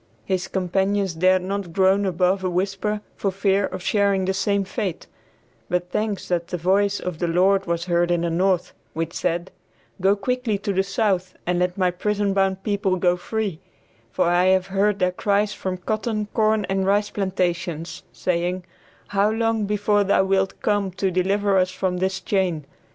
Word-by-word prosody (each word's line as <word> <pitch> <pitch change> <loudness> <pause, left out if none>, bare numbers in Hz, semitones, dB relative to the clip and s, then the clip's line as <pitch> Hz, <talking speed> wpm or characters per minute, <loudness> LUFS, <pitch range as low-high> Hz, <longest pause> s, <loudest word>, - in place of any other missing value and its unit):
His 185 -1 -1
companions 190 +1 0
dared 185 +2 +3
not 195 -2 -4
groan 195 +2 +3
above 185 +1 +1
a 185 - 0
whisper 195 +3 -1
for 200 - -1
fear 195 +1 +1
of 180 - -7
sharing 200 -2 +2
the 190 - 0
same 200 +1 +1
fate; 195 -2 -4 0.6
but 180 0 -1
thanks 210 -1 -2
that 170 -1 0
the 180 - -3
voice 195 +4 +2
of 180 -3 -5
the 175 - 0
Lord 190 +3 +2
was 170 0 -1
heard 175 -1 +1
in 175 -1 +1
the 170 -1 -1
North, 180 +1 +1 0.2
which 165 +1 -3
said, 175 0 -2 0.5
"Go 195 +2 +4
quickly 230 +1 -1
to 200 0 -3
the 190 - +2
South 195 -2 -1
and 175 0 0
let 180 +1 0
my 185 -2 +2
prison 205 +2 -1
bound 195 -1 +1
people 200 -2 0
go 180 -1 +2
free, 195 -1 -3 0.5
for - - +1
I 175 +1 +3
have 185 0 +3
heard 200 +1 +2
their 180 -2 +1
cries 205 +2 +1
from 185 -2 -4
cotton, 215 +3 -2
corn 215 -2 +2
and 195 +1 -1
rice 205 +1 +2
plantations, 175 -4 -2
saying, 180 +1 -1 0.5
how 200 +1 +2
long 225 -1 0
before 205 0 +2
thou 195 -1 +3
wilt 195 0 0
come 205 -2 +1
to 190 0 -1
deliver 195 +2 +2
us 185 0 +2
from 185 0 -2
this 190 +1 -1
chain?" 185 -6 -1
190 Hz, 180 wpm, -23 LUFS, 180-200 Hz, 0.6 s, Go